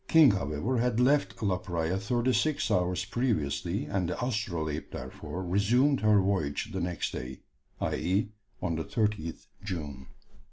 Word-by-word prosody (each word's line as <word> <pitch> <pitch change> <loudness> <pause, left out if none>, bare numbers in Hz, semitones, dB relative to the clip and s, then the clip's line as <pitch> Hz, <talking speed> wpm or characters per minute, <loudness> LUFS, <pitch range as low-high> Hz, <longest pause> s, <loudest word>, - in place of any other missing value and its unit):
King, 160 -6 +7
however, 95 - -1
had 120 -1 +1
left 135 -1 +2
La 95 -3 +1
Praya 85 -2 -1
thirty 120 +6 +1
six 155 +2 +1
hours 90 0 +1
previously, 100 - -1
and 95 -4 -1
the - - -3
Astrolabe 85 - -2
therefore 85 +6 -6
resumed 120 +10 +3
her 105 -1 +5
voyage 95 -8 0
the - - -2
next 90 -1 -2
day, 65 +1 -6 0.4
i.e. 100 +4 0 0.3
on 85 -2 0
the 80 - -2
30th 105 -7 -2 0.2
June. 75 -9 -5
95 Hz, 145 wpm, -29 LUFS, 85-120 Hz, 0.4 s, King